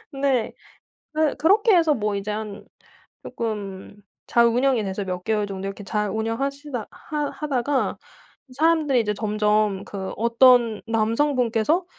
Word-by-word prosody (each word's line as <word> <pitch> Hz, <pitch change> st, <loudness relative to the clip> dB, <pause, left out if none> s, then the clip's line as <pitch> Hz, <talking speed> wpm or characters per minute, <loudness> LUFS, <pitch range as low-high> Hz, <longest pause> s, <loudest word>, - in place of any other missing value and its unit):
근데 270 Hz, -4 st, 0 dB, 0.6 s
그 310 Hz, -1 st, +1 dB
그렇게 415 Hz, +6 st, +4 dB
해서 325 Hz, -3 st, +4 dB
뭐 210 Hz, -3 st, -1 dB
이제 200 Hz, +1 st, -4 dB
한 210 Hz, -1 st, -5 dB, 0.6 s
쪼끔 205 Hz, -3 st, -5 dB, 0.3 s
잘 235 Hz, 0 st, +4 dB
운영이 245 Hz, 0 st, +2 dB
돼서 195 Hz, +1 st, -3 dB
몇 180 Hz, -1 st, -4 dB
개월 215 Hz, -2 st, 0 dB
정도 195 Hz, -1 st, -6 dB
이렇게 200 Hz, +1 st, -8 dB
잘 210 Hz, +2 st, -1 dB
운영하시다 245 Hz, +4 st, -3 dB
하 295 Hz, -2 st, -4 dB
하다가 275 Hz, -2 st, -1 dB, 0.6 s
사람들이 310 Hz, -4 st, +3 dB
이제 210 Hz, -2 st, 0 dB
점점 210 Hz, -1 st, 0 dB
그 190 Hz, -2 st, -6 dB
어떤 235 Hz, -1 st, +4 dB
남성분께서 230 Hz, -, +1 dB
230 Hz, 270 characters per minute, -23 LUFS, 210-280 Hz, 0.6 s, 그렇게